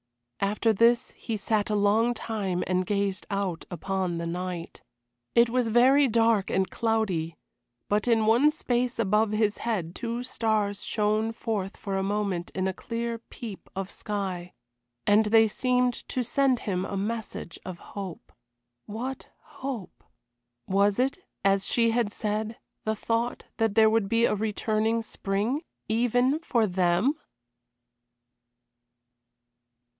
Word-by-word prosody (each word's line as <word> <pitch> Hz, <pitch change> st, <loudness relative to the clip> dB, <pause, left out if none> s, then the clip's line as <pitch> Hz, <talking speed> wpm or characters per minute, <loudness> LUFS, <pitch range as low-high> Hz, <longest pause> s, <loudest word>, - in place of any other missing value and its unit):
After 210 Hz, +3 st, +2 dB
this 235 Hz, +3 st, +3 dB
he 225 Hz, -2 st, -4 dB
sat 210 Hz, 0 st, 0 dB
a 210 Hz, -, +1 dB
long 215 Hz, +4 st, +3 dB
time 200 Hz, -6 st, -2 dB
and 185 Hz, 0 st, 0 dB
gazed 200 Hz, -1 st, -1 dB
out 195 Hz, -5 st, -2 dB
upon 185 Hz, 0 st, -2 dB
the 170 Hz, -, -3 dB
night. 175 Hz, 0 st, -5 dB, 0.5 s
It 235 Hz, 0 st, +6 dB
was 245 Hz, -2 st, +1 dB
very 265 Hz, +5 st, +5 dB
dark 225 Hz, -3 st, +3 dB
and 190 Hz, 0 st, +1 dB
cloudy, 210 Hz, -8 st, -1 dB, 0.5 s
but 210 Hz, +3 st, +1 dB
in 225 Hz, -2 st, +3 dB
one 235 Hz, +7 st, +5 dB
space 250 Hz, -5 st, -1 dB
above 215 Hz, 0 st, +2 dB
his 215 Hz, -1 st, +1 dB
head 190 Hz, -8 st, -2 dB
two 235 Hz, +3 st, -3 dB
stars 215 Hz, -5 st, 0 dB
shone 215 Hz, +1 st, +1 dB
forth 215 Hz, -4 st, -3 dB
for 195 Hz, -1 st, -4 dB
a 195 Hz, -, +1 dB
moment 195 Hz, -3 st, -1 dB
in 185 Hz, 0 st, 0 dB
a 190 Hz, -, -1 dB
clear 230 Hz, +3 st, -4 dB
peep 225 Hz, -3 st, -9 dB
of 195 Hz, 0 st, -4 dB
sky, 190 Hz, -4 st, -4 dB, 0.5 s
and 210 Hz, +1 st, +5 dB
they 225 Hz, +1 st, +6 dB
seemed 250 Hz, +2 st, +1 dB, 0.2 s
to 255 Hz, -, -1 dB
send 260 Hz, +1 st, +2 dB
him 185 Hz, -3 st, -1 dB
a 195 Hz, -, -3 dB
message 210 Hz, -4 st, -4 dB
of 185 Hz, -2 st, -6 dB, 0.2 s
hope. 195 Hz, -4 st, -7 dB, 0.6 s
What 250 Hz, +5 st, -5 dB, 0.2 s
hope? 260 Hz, -8 st, -7 dB, 0.6 s
Was 200 Hz, +1 st, +2 dB
it, 270 Hz, +6 st, +1 dB, 0.3 s
as 195 Hz, 0 st, +3 dB
she 230 Hz, -1 st, +3 dB
had 230 Hz, -3 st, +1 dB
said, 215 Hz, +2 st, -2 dB, 0.3 s
the 220 Hz, 0 st, 0 dB
thought 230 Hz, +3 st, -1 dB
that 225 Hz, -3 st, +1 dB
there 220 Hz, -1 st, +6 dB
would 220 Hz, -3 st, +1 dB
be 230 Hz, +1 st, +3 dB
a -, -, +2 dB
returning 220 Hz, +2 st, 0 dB
spring 210 Hz, +7 st, -1 dB, 0.3 s
even 245 Hz, +5 st, +2 dB
for 240 Hz, -9 st, +1 dB
them? 180 Hz, +6 st, +2 dB
215 Hz, 140 wpm, -27 LUFS, 195-230 Hz, 0.6 s, It